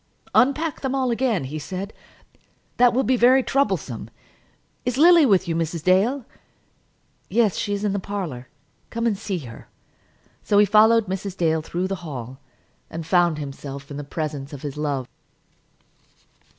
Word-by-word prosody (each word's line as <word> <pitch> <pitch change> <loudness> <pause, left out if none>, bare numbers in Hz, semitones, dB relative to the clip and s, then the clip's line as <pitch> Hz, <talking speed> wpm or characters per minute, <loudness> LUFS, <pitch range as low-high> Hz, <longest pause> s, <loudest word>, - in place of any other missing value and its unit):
"Unpack 290 +5 +2
them 265 0 -1
all 260 -2 +1
again," 230 - 0
he 145 +4 -5
said. 190 +6 -6 0.8
"That 245 -1 +6
will 260 +3 +1
be 260 - +2
very 255 +2 +5
troublesome. 275 +2 -1 0.7
Is 250 0 -2
Lily 335 -1 +7
with 190 -4 +3
you, 165 - -1
Mrs. 165 -1 -2
Dale?" 215 +9 +2 1.0
"Yes, 220 -7 +2
she 205 - -2
is 200 0 -3
in 205 -2 0
the 200 - -1
parlour. 180 -11 -5 0.4
Come 230 0 -3
and 225 -3 +2
see 195 -2 -4
her." 115 -1 -11 0.7
So 205 - +1
he 210 - +7
followed 220 +2 +5
Mrs. 190 0 -5
Dale 160 -2 +1
through 175 +3 -3
the 195 0 -3
hall, 130 -5 -7 0.5
and 165 0 -6
found 175 -2 +3
himself 140 -1 -7
in 140 - -6
the 145 - -5
presence 145 -1 -5
of 140 - -9
his 145 -2 -5
love. 145 -4 -2
190 Hz, 160 wpm, -23 LUFS, 155-235 Hz, 1.0 s, Lily